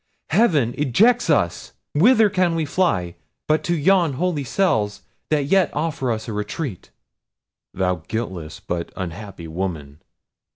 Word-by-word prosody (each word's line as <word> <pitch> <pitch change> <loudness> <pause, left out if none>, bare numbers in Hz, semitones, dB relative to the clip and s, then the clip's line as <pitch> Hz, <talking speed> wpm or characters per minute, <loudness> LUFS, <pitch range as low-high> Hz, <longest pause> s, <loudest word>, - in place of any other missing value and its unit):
heaven 150 - +3
ejects 205 - +3
us—whither 170 - +2
can 185 -4 +1
we 160 -1 0
fly, 115 - 0 0.3
but 155 0 +2
to 175 - 0
yon 170 -1 +3
holy 155 +1 -1
cells 110 - 0 0.3
that 150 -2 +1
yet 185 +2 +3
offer 150 -5 -1
us 110 0 -3
a 110 - -4
retreat." 105 - -4 0.9
"Thou 90 -2 0
guiltless 95 -9 -4
but 85 -1 -4
unhappy 95 -1 -7
woman! 80 -4 -5
135 Hz, 125 wpm, -22 LUFS, -, 0.9 s, heaven